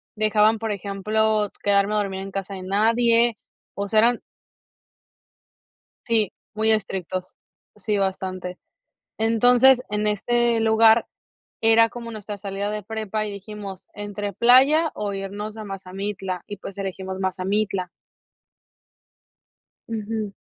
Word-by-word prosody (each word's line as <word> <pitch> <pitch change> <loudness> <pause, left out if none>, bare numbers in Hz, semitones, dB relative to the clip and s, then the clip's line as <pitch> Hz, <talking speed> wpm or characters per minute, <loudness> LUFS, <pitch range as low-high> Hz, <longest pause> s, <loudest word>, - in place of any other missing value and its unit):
dejaban, 215 +1 +3
por 225 0 -2
ejemplo, 210 +1 0
quedarme 200 0 +3
a - - +2
dormir 195 -2 -2
en 195 0 -7
casa 195 0 -5
de 185 - -7
nadie, 230 +4 +3 0.4
o 200 0 -3
sea, 215 +2 +3
eran 235 +2 +3 1.9
Sí, 220 -4 +1 0.2
muy 220 +1 +2
estrictos, 185 -3 -3 0.4
sí, 210 0 -1
bastante. 185 -2 -3 0.6
Entonces, 245 +3 +5
en 210 0 -1
este 235 +3 +1
lugar 225 0 +5 0.5
era 225 0 +5
como 235 0 -8
nuestra 210 -1 -7
salida 200 +1 -4
de 210 -1 -4
prepa 215 0 -3
y 210 - -5
dijimos 200 -1 -8
entre 205 0 -5
playa 270 - +5
o 205 -1 -3
irnos 205 +2 -5
a 220 - -6
Mazamitla, 195 -1 -5
y 205 - -6
pues 195 +1 -9
elegimos 190 -1 -5
Mazamitla. 190 0 -1 2.0
Ujú. 220 -2 -3
210 Hz, 120 wpm, -23 LUFS, 195-225 Hz, 2.0 s, Entonces